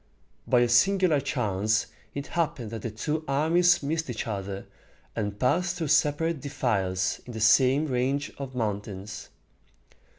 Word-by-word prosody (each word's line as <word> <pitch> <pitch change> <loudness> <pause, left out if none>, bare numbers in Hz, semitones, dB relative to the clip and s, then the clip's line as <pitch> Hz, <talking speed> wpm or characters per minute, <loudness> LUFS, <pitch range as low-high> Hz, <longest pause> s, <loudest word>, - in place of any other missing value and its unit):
By 125 -2 +4
a 120 - +4
singular 175 +6 +4
chance 105 -1 0 0.3
it 140 0 -3
happened 140 -9 -2
that 115 -2 -5
the 115 - -3
two 150 +9 -3
armies 165 +5 +3
missed 160 +1 -2
each 115 -3 -3
other, 100 -2 -4 0.5
and 105 -2 -3
passed 170 +9 +1
through 165 -4 -3
separate 150 +1 +2
defiles 95 -10 -1
in 120 - -7
the 110 - -5
same 130 +6 +4
range 135 +1 -1
of 135 -2 -6
mountains. 105 -3 -4
130 Hz, 140 wpm, -27 LUFS, 110-155 Hz, 0.5 s, By